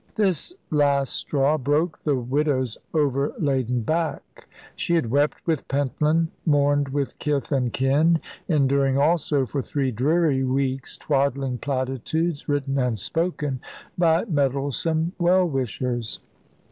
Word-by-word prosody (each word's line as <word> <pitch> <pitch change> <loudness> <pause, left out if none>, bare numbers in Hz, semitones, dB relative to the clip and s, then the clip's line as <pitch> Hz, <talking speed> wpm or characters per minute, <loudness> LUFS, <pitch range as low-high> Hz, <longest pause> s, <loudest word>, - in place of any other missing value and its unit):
This 200 - +1 0.2
last 140 -3 +2
straw 145 +2 +1
broke 150 +5 0
the 145 -2 0
widow's 130 -1 0 0.2
overladen 140 -4 0
back. 160 +7 -3 0.3
She 170 - 0
had 145 -9 0
wept 145 +2 +2
with 160 -4 -1
Pentland, 150 +4 +1
mourned 145 -2 +2
with 140 0 -3
kith 145 -2 -1
and 130 -4 +1
kin, 150 +7 +3 0.3
enduring 140 -3 +2
also, 150 -2 +2
for 140 +2 -3
three 135 -1 -1
dreary 140 +3 +2
weeks, 130 0 0
twaddling 135 -2 0
platitudes, 140 +5 -2
written 140 -1 0
and 125 -3 0
spoken, 150 - -1 0.4
by 170 +1 +3
meddlesome 155 - 0
well 180 +1 +4
wishers. 125 -4 -2
140 Hz, 120 wpm, -24 LUFS, 135-155 Hz, 0.4 s, well